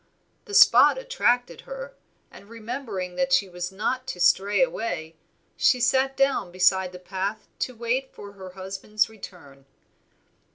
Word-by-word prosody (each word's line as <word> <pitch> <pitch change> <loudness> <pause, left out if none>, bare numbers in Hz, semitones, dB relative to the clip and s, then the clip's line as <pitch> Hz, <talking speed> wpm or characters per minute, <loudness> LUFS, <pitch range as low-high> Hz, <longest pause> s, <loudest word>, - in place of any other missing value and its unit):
The 410 - -6
spot - - +7
attracted 470 - 0
her, - - -8 0.4
and 200 - -15
remembering 225 -6 -6
that 270 0 0
she 210 -7 +3
was 180 0 -6
not 255 +6 -3
to 180 - -6
stray 195 +5 +3
away, 165 -10 -3 0.4
she 255 - +3
sat 265 +2 +1
down 275 -9 +1
beside 185 0 +2
the 180 - -9
path 195 +3 -4
to 255 - -3
wait 240 +3 -2
for 200 - -11
her 190 -2 -11
husband's 195 +3 -2
return. 175 -10 -13
210 Hz, 140 wpm, -25 LUFS, 185-255 Hz, 0.4 s, spot